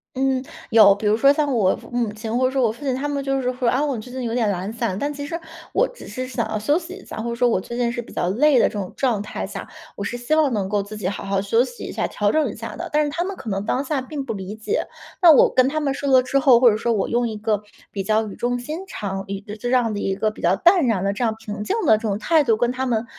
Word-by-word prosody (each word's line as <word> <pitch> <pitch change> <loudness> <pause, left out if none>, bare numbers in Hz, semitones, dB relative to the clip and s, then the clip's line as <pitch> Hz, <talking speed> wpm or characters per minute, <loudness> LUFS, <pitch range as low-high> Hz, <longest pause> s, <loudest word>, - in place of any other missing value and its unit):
嗯， 265 0 +1 0.3
有。 205 -3 +7
比 210 - -6
如 210 - +4
说 275 +5 +5
像 290 -1 0
我 200 -6 +3 0.2
母 240 -3 -1
亲 220 +2 -4
或 255 +1 +2
者 255 - +1
说 265 -1 +1
我 225 - +3
父 265 +6 -12
亲， 265 -2 0
他 280 +3 -2
们 280 -1 -2
就 270 0 0
是 250 -1 -1
说， 250 -1 0
啊， 265 +4 +1
“我 280 -3 -1
最 245 +3 -10
近 260 -1 -5
有 230 -1 -2
点 230 -4 +1
懒 190 +2 -3
散”， 190 -4 -2
但 290 +4 -2
其 285 0 -6
实 335 +3 -4 0.3
我 - - +2
只 - - -13
是 255 -1 -5
想 250 -2 -3
要 215 - -1
休 290 +10 +1
息 360 +2 -9
一 395 - -13
下， - - -8
或 235 - -3
者 235 - -3
说 245 +1 +3
我 185 -5 +1
最 235 - -7
近 240 -1 +1
是 240 0 -3
比 230 - -14
较 - - -1
累 265 +7 +4
的 - - +5
这 - - -5
种 195 -3 -4
状 240 -7 +1
态 210 - -5
下， - - -7 0.3
我 200 - -5
是 240 +4 -3
希 245 +6 -2
望 310 -3 +3
能 205 -5 -1
够 205 0 0
自 210 +2 -8
己 185 -3 -3
好 200 - -4
好 195 0 0
休 225 +4 +2
息 480 - -8
一 - - -5
下、 - - -1
调 205 0 0
整 310 -6 +1
一 - - -10
下 225 +1 -7
的。 - - -6
但 300 0 +3
是 - - -2
他 340 +3 -1
们 390 +1 -4
可 235 -5 -7
能 195 0 -2
当 260 +5 0
下 285 -1 -1
并 275 +1 -6
不 225 - -3
理 195 +1 -6
解， 315 - -2 0.3
那 340 -2 +9
我 290 - +5
跟 260 +1 +4
他 310 - -1
们 280 -3 0
说 280 0 -3
了 260 -1 +6
之 275 +2 +1
后， 260 -3 +6
或 245 -3 +6
者 210 - 0
说 235 +2 -1
我 210 -4 0
用 240 0 0
一 215 - -5
个 210 -1 0 0.3
比 200 - -3
较 215 +2 +1
语 200 - -8
重 245 +1 -1
心 300 +7 -5
长 195 - -5 0.2
这 210 0 -7
这 245 +3 -4
样 245 -4 +2
的 205 - -3
一 195 - -1
个 215 +2 0
比 - - -13
较 175 +2 +3
淡 345 - +4
然 200 -5 +1
的 200 0 0
这 240 - -3
样 220 -1 +1
平 210 -2 -6
静 315 - -1
的 220 -5 +6
这 - - -10
种 200 -1 0
态 315 +5 +3
度 225 -4 +2
跟 240 +1 +1
他 260 +1 -2
们 230 -1 0
240 Hz, 340 characters per minute, -22 LUFS, 210-270 Hz, 0.3 s, 那